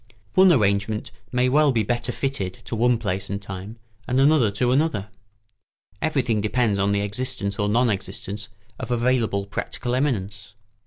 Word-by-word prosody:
One 190 0 +7
arrangement 105 -4 +1 0.2
may 125 0 +2
well 145 +2 +4
be 115 -3 +1
better 120 +3 -1
fitted 120 -9 -2
to - - -4
one 120 +2 +3
place 100 -4 -2
and 100 0 -2
time, 100 +2 -8 0.3
and 125 +1 +1
another 140 -5 +5
to 120 +5 0
another. 130 -8 +1 0.9
Everything 125 -8 +1
depends 110 -1 +1
on 100 +1 +2
the 100 0 +1
existence 105 -1 -2
or 105 0 +1
non 120 +2 +3
existence 100 +1 -5 0.3
of - - -5
available 120 -4 +1
practical 120 +4 -4
eminence. 105 -7 -2
110 Hz, 155 wpm, -23 LUFS, 100-125 Hz, 0.9 s, One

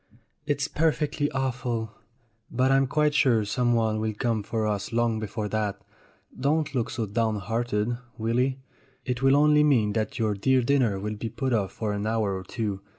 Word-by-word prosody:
"It's 145 0 0
perfectly 150 -2 0
awful. 125 -4 -2 0.6
But 130 +2 +2
I'm 135 0 +4
quite 150 +2 +2
sure 120 -8 +3
someone 115 -1 +1
will 110 -1 -2
come 115 -2 0
for 110 +1 -2
us 105 0 -2
long 115 -1 +1
before 105 0 -4
that. 105 -2 -1 0.6
Don't 150 +3 0
look 120 -4 -1
so 115 -2 -2
downhearted, 115 +1 -1 0.2
Willy; 125 +4 0 0.5
it 125 -1 -2
will 135 +1 +5
only 150 +1 +5
mean 115 -8 +3
that 110 0 -2
your 110 -2 +1
dear 130 +6 +2
dinner 120 -6 +2
will 105 +2 -4
be 115 +2 -4
put 130 +3 -2
off 100 -4 0
for 105 -2 -2
an 100 +1 -2
hour 110 -3 0
or 95 - -5
two. 105 -3 -3
115 Hz, 170 wpm, -26 LUFS, 105-130 Hz, 0.6 s, will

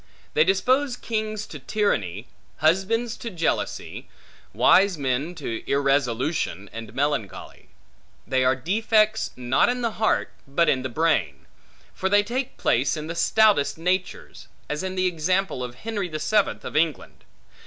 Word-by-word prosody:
They 155 - +5
dispose 245 - +1
kings 215 -2 -3
to 150 - -9
tyranny, 115 - -1 0.3
husbands 195 +9 +1
to 235 - -6
jealousy, 165 -5 -3 0.4
wise 190 -2 +4
men 140 +5 -2
to 115 -8 -5
irresolution 135 - 0
and 115 -1 -8
melancholy. 135 -7 -3 0.6
They 130 -1 +1
are 130 +1 +3
defects, 215 - +1
not 125 - +2
in 245 0 -1
the 220 -5 -2
heart, 220 - +1 0.2
but 165 +5 +2
in 130 - +2
the 130 - -4
brain; 120 - 0 0.5
for 190 - -2
they 205 +1 +4
take 245 +4 -4
place 135 +6 +1
in 155 - -5
the 165 - -4
stoutest 200 -5 +3
natures; 180 +3 -3 0.2
as 150 0 -3
in 190 0 -4
the 185 0 +1
example 180 -3 0
of 120 -1 -6
Henry 205 - -4
the 155 - -4
Seventh 205 +7 +1
of - - -7
England. 155 -2 -1
165 Hz, 145 wpm, -24 LUFS, 135-210 Hz, 0.6 s, They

